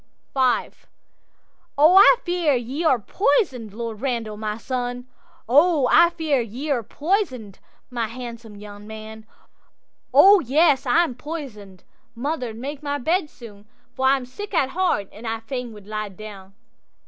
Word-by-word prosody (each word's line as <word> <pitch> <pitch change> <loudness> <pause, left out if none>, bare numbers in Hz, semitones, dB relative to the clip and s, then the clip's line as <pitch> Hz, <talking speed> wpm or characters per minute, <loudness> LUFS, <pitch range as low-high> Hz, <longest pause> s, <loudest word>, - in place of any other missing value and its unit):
'V'O 260 -2 +1 1.2
I 395 +5 +9
fear 345 -5 +1
ye 255 +7 -3
are 290 -6 +4
poison'd, 250 - 0
Lord 225 0 -6
Randal, 235 -5 -2
my 210 0 -4
son!O 255 +4 0
I 340 0 +7
fear 315 -6 0
ye 245 +7 -5
are 255 -4 +1
poison'd, 265 - -2 0.3
my 235 -2 -2
handsome 235 -2 -9
young 205 0 -11
man!'—'O 220 - 0
yes! 285 -1 +2
I 325 +8 +4
am 320 - -3
poison'd; 240 - -8 0.3
mother, 255 -1 -3
make 270 +6 -7
my 285 -1 -2
bed 320 +4 0
soon, 210 -6 -14 0.3
For 265 - 0
I'm 270 -1 +2
sick 405 +10 -8
at 265 -5 +2
the - - -10
heart, 350 - 0
and 225 +3 -10
I 225 0 -2
fain 250 +1 -6
wald 210 -2 -13
lie 215 0 -4
down. 195 -1 -11
250 Hz, 140 wpm, -22 LUFS, 220-295 Hz, 1.2 s, I